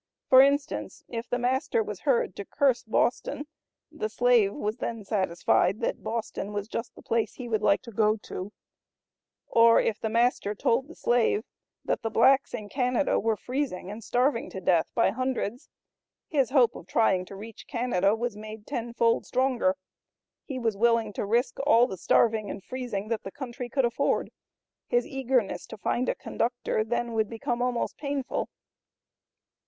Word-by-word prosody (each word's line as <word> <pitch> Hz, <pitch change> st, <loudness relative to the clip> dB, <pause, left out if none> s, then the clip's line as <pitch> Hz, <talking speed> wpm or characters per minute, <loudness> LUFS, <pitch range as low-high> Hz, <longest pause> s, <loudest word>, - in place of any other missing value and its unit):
For 260 Hz, 0 st, +9 dB
instance 280 Hz, +2 st, 0 dB
if 230 Hz, 0 st, -5 dB
the 245 Hz, -, 0 dB
master 245 Hz, -2 st, +1 dB
was 210 Hz, -3 st, -6 dB
heard 255 Hz, -, +1 dB
to 200 Hz, -, -5 dB
curse 270 Hz, +3 st, +1 dB
Boston 240 Hz, +5 st, 0 dB, 0.5 s
the 435 Hz, -, -3 dB
slave 475 Hz, -5 st, +3 dB
was 215 Hz, -5 st, -3 dB
then 225 Hz, -4 st, -4 dB
satisfied 190 Hz, 0 st, +1 dB
that -, -, -1 dB
Boston 220 Hz, -2 st, -4 dB
was 205 Hz, 0 st, -3 dB
just 230 Hz, +1 st, -5 dB
the -, -, -14 dB
place 225 Hz, -2 st, -1 dB
he 250 Hz, -, -7 dB
would 220 Hz, -2 st, 0 dB
like 205 Hz, +1 st, +3 dB
to 235 Hz, -, -10 dB
go 215 Hz, 0 st, +2 dB
to; 190 Hz, +3 st, -6 dB, 0.9 s
or 230 Hz, 0 st, +6 dB
if 215 Hz, -, 0 dB
the 220 Hz, -, -2 dB
master 230 Hz, -2 st, +1 dB
told 235 Hz, +6 st, +1 dB
the 330 Hz, -, -12 dB
slave 235 Hz, -3 st, +2 dB, 0.4 s
that -, -, -1 dB
the 225 Hz, -, -2 dB
blacks 260 Hz, +5 st, +4 dB
in 210 Hz, -, -7 dB
Canada 250 Hz, +3 st, +1 dB
were 225 Hz, -1 st, 0 dB
freezing 250 Hz, -8 st, -3 dB
and 220 Hz, +2 st, -8 dB
starving 245 Hz, +2 st, +1 dB
to 190 Hz, -, -6 dB
death 175 Hz, -3 st, +2 dB
by 230 Hz, -, +3 dB
hundreds, 255 Hz, -2 st, -3 dB, 0.6 s
his 275 Hz, -6 st, +1 dB
hope 250 Hz, -4 st, +4 dB
of 175 Hz, -, -10 dB
trying 190 Hz, -5 st, +2 dB
to 195 Hz, -, -10 dB
reach 215 Hz, +2 st, -10 dB
Canada 225 Hz, -6 st, +1 dB
was 235 Hz, -1 st, -3 dB
made 215 Hz, 0 st, -9 dB
tenfold 235 Hz, -3 st, 0 dB
stronger; 265 Hz, +2 st, +1 dB, 0.7 s
he 270 Hz, -, -6 dB
was 230 Hz, -4 st, 0 dB
willing 230 Hz, 0 st, +2 dB
to 200 Hz, -, -3 dB
risk 240 Hz, +4 st, +1 dB
all 240 Hz, -4 st, +6 dB
the 220 Hz, -, -5 dB
starving 215 Hz, +4 st, +2 dB
and 195 Hz, -, -6 dB
freezing 235 Hz, -5 st, -4 dB
that 230 Hz, -2 st, -1 dB
the -, -, -7 dB
country 250 Hz, -1 st, -6 dB
could 265 Hz, +1 st, +2 dB
afford; 235 Hz, -, 0 dB, 0.6 s
his 240 Hz, 0 st, +2 dB
eagerness 260 Hz, -5 st, -1 dB
to 220 Hz, -, -9 dB
find 240 Hz, +4 st, -1 dB
a -, -, 0 dB
conductor 240 Hz, -2 st, -1 dB
then 235 Hz, +1 st, -2 dB
would 220 Hz, -2 st, 0 dB
become 235 Hz, +1 st, -3 dB
almost 245 Hz, -1 st, -1 dB
painful. 280 Hz, -2 st, -2 dB
235 Hz, 170 wpm, -27 LUFS, 215-255 Hz, 0.9 s, For